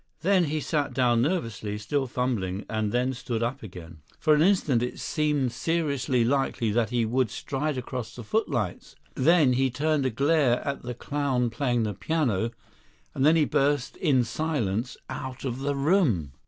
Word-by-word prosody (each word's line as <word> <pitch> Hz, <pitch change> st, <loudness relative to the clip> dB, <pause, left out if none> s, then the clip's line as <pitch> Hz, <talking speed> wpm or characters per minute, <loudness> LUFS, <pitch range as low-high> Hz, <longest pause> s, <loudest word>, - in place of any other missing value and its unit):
Then 185 Hz, 0 st, +3 dB
he 155 Hz, +1 st, -1 dB
sat 145 Hz, -4 st, -1 dB
down 120 Hz, -3 st, +3 dB
nervously, 115 Hz, -, -2 dB
still 135 Hz, +6 st, -1 dB
fumbling, 110 Hz, -6 st, -2 dB
and 110 Hz, -2 st, -1 dB
then 125 Hz, +3 st, +1 dB
stood 120 Hz, -2 st, -3 dB
up 130 Hz, +4 st, -2 dB
again. 85 Hz, -5 st, -10 dB, 0.2 s
For 155 Hz, -, +3 dB
an 150 Hz, -, +4 dB
instant 160 Hz, -9 st, +3 dB
it 125 Hz, -, -3 dB
seemed 150 Hz, -5 st, 0 dB
seriously 140 Hz, -4 st, 0 dB
likely 130 Hz, -3 st, 0 dB
that 115 Hz, 0 st, +1 dB
he 120 Hz, -1 st, +1 dB
would 125 Hz, +1 st, +1 dB
stride 140 Hz, +6 st, -3 dB
across 125 Hz, -2 st, -5 dB
the 120 Hz, -, -8 dB
footlights; 120 Hz, -, -2 dB, 0.2 s
then 150 Hz, -2 st, +4 dB
he 130 Hz, +1 st, +2 dB
turned 145 Hz, +2 st, 0 dB
a -, -, +1 dB
glare 135 Hz, 0 st, +2 dB
at 140 Hz, -, -2 dB
the 125 Hz, 0 st, -6 dB
clown 130 Hz, -3 st, -1 dB
playing 120 Hz, -1 st, 0 dB
the 105 Hz, -1 st, -2 dB
piano; 115 Hz, -, 0 dB, 0.6 s
and 135 Hz, -, -1 dB
then 155 Hz, +3 st, +6 dB
he 155 Hz, -2 st, +4 dB
burst 140 Hz, -1 st, +1 dB
in 135 Hz, -7 st, +3 dB
silence 120 Hz, -4 st, -2 dB
out 130 Hz, -1 st, -6 dB
of 125 Hz, -1 st, -3 dB
the 140 Hz, +1 st, -1 dB
room. 140 Hz, -, +2 dB
130 Hz, 170 wpm, -26 LUFS, 115-145 Hz, 0.6 s, then